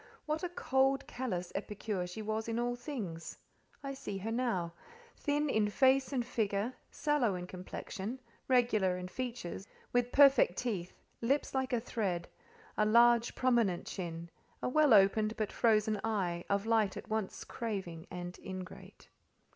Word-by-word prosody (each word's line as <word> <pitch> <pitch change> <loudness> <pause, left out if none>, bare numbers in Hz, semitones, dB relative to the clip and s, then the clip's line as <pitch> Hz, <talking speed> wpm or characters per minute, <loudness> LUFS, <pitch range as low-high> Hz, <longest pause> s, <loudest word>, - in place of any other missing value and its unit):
What 305 +1 -1
a 360 - -1
cold, 270 -5 +1
callous 185 -9 -3
epicure 205 -3 -3
she 195 +5 -6
was 220 +1 -2
in 230 0 -1
all 240 0 0
things! 220 - -6 0.5
I 275 0 -3
see 205 -7 -5
her 210 +4 -4
now. 225 -9 -1 0.4
Thin 295 +1 0
in 215 -6 +2
face 265 +5 +3
and 250 -4 0
figure, 220 -1 -1 0.2
sallow 280 -10 +1
in 180 0 -5
complexion, 190 +5 -6 0.3
regular 220 -8 +3
in 180 0 -5
features, 230 -5 -5 0.3
with 245 0 +2
perfect 275 -10 +6
teeth, 195 -8 -3 0.2
lips 270 +5 +1
like 265 -1 0
a 245 - +2
thread, 195 -7 -2 0.5
a - - +5
large, 235 +2 +5
prominent 235 -8 +2
chin, 170 -2 -5 0.3
a - - +1
well 295 -3 +6
opened, 215 +3 +4
but 215 -3 -1
frozen 215 -2 +2
eye, 185 -6 -1
of 200 +1 +1
light 220 -3 +2
at - - -8
once 215 -3 -2
craving 190 -8 -5
and 180 0 -6
ingrate. 185 -1 -9
220 Hz, 150 wpm, -33 LUFS, 190-250 Hz, 0.5 s, perfect